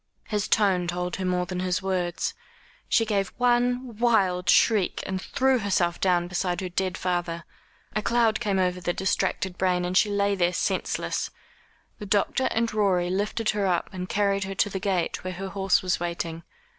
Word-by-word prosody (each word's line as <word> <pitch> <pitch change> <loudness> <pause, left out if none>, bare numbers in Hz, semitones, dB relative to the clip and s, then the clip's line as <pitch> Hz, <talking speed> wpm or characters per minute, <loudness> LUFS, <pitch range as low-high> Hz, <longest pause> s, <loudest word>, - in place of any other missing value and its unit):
His 210 -2 -1
tone 190 -5 +2
told 180 0 -3
her 190 - -3
more 180 0 0
than 180 0 -4
his 185 +1 -1
words. 180 -2 -1 0.6
She 225 - +3
gave 200 -3 0
one 245 -1 +1
wild 195 -7 +2
shriek, 210 -5 +3
and 190 -1 -3
threw 265 +3 +1
herself 180 -4 0
down 175 -2 +2
beside 180 0 -1
her 185 - -3
dead 185 +1 -2
father. 175 -2 -2 0.5
A 215 - +1
cloud 230 -1 +2
came 205 -4 0
over 180 -1 0
the 175 0 -1
distracted 190 -1 -1
brain, 180 -1 +1
and 180 +1 -2
she 210 - +4
lay 200 0 +1
there 180 -2 +1
senseless. - - -1 0.7
The 210 - -7
doctor 210 +6 +1
and 230 0 0
Rorie 185 -4 +1
lifted 210 +3 0
her 205 -2 0
up 180 +1 0
and 185 -1 -5
carried 200 -1 +1
her 195 0 -5
to 205 - +1
the 190 - -3
gate 185 -3 -1
where 185 0 -4
her 190 +2 -5
horse 195 +3 +1
was 185 - 0
waiting. 170 -1 -3
190 Hz, 180 wpm, -26 LUFS, 180-210 Hz, 0.7 s, she